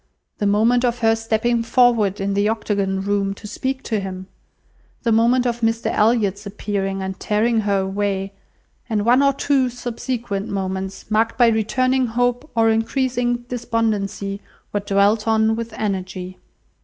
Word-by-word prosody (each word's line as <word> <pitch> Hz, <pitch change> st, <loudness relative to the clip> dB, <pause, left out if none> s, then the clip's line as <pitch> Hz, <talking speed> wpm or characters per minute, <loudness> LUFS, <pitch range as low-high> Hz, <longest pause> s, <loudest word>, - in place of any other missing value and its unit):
The 205 Hz, -, +1 dB
moment 225 Hz, +5 st, +3 dB
of 245 Hz, -1 st, +1 dB
her 225 Hz, 0 st, +5 dB
stepping 225 Hz, +1 st, 0 dB
forward 230 Hz, -4 st, +3 dB
in 195 Hz, 0 st, -1 dB
the 200 Hz, +1 st, +2 dB
Octagon 200 Hz, -3 st, -1 dB
Room 200 Hz, 0 st, -1 dB
to 210 Hz, -, -13 dB
speak 260 Hz, +5 st, -3 dB
to 220 Hz, -2 st, -1 dB
him: 190 Hz, -1 st, -6 dB, 0.8 s
the 235 Hz, -, +1 dB
moment 235 Hz, +3 st, +3 dB
of 240 Hz, -1 st, -1 dB
Mr 225 Hz, 0 st, 0 dB
Elliot's 210 Hz, -2 st, +1 dB
appearing 195 Hz, -1 st, -3 dB
and 190 Hz, 0 st, -5 dB
tearing 225 Hz, +2 st, +1 dB
her 200 Hz, -2 st, +1 dB
away, 195 Hz, 0 st, -2 dB, 0.6 s
and 210 Hz, -2 st, 0 dB
one 245 Hz, +3 st, +5 dB
or 280 Hz, 0 st, +4 dB
two 275 Hz, -1 st, +1 dB
subsequent 235 Hz, -4 st, -4 dB
moments, 190 Hz, +1 st, -4 dB
marked 225 Hz, +1 st, +1 dB
by 240 Hz, -2 st, +6 dB
returning 255 Hz, +4 st, +1 dB
hope 245 Hz, +5 st, -1 dB
or 225 Hz, -1 st, +4 dB
increasing 240 Hz, +1 st, 0 dB
despondency, 215 Hz, -4 st, -2 dB, 0.3 s
were 205 Hz, -, +1 dB
dwelt 200 Hz, +2 st, +2 dB
on 220 Hz, 0 st, +3 dB
with 230 Hz, 0 st, -5 dB
energy. 185 Hz, -3 st, -4 dB
220 Hz, 150 wpm, -21 LUFS, 200-240 Hz, 0.8 s, by